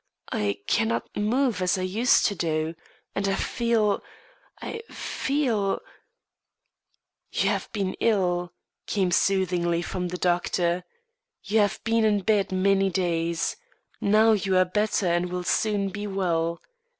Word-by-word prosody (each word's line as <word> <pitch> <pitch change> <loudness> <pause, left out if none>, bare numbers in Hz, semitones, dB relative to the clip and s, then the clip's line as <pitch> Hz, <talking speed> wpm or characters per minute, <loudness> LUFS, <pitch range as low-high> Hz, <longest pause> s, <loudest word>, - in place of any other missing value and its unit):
"I 100 -1 -1
cannot 115 +1 0
move 235 +1 +1
as 180 +1 +2
I 185 - -2
used 215 +7 +3
to - - +2
do, 160 -3 -1 0.4
and 200 0 -1
I 195 - +1
feel 230 -4 +1 0.6
I 455 - -5
feel 240 -9 -1 0.8
" - - -51
"You - - +1
have - - -2
been 195 -3 -2
ill," 180 -5 +1 0.4
came 190 -3 0
soothingly 175 -2 +1
from 180 0 -3
the 180 +1 -4
doctor. 175 0 0 0.6
"You 215 +2 +1
have 205 0 +2
been 225 0 +2
in 210 -2 +3
bed 205 -1 +1
many 195 +1 +2
days; 170 -2 -1 0.5
now 215 +2 +5
you 195 -3 +2
are 185 - +5
better 210 +2 0
and 175 +1 +1
will 180 0 -3
soon 205 +1 +1
be 205 +1 -5
well. 170 -4 -1
190 Hz, 140 wpm, -26 LUFS, 175-210 Hz, 0.8 s, now